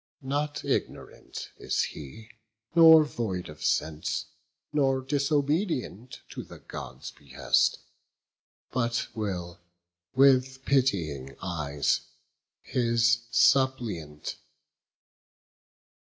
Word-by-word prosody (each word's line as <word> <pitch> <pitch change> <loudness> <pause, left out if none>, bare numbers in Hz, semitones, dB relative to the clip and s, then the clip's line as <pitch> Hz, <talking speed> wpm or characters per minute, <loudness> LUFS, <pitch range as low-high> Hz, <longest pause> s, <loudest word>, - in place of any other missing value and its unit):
Not 145 +2 -2
ignorant - - -4
is - - 0
he, 95 +10 -8 0.4
nor 160 -2 +9
void 110 - -4
of 75 +1 -10
sense, 80 -1 -1 0.5
Nor 135 -3 +2
disobedient 140 - -1
to - - -6
the - - -12
Gods' 65 +3 -8
behest 65 -3 +1 0.9
But 120 -2 -1
will 90 -5 -4 0.6
with 130 0 +4
pitying 85 - 0
eyes 75 -5 -1 0.6
his 115 -1 +2
suppliant 120 - +2
view." - - -4
120 Hz, 80 wpm, -28 LUFS, 80-135 Hz, 0.9 s, nor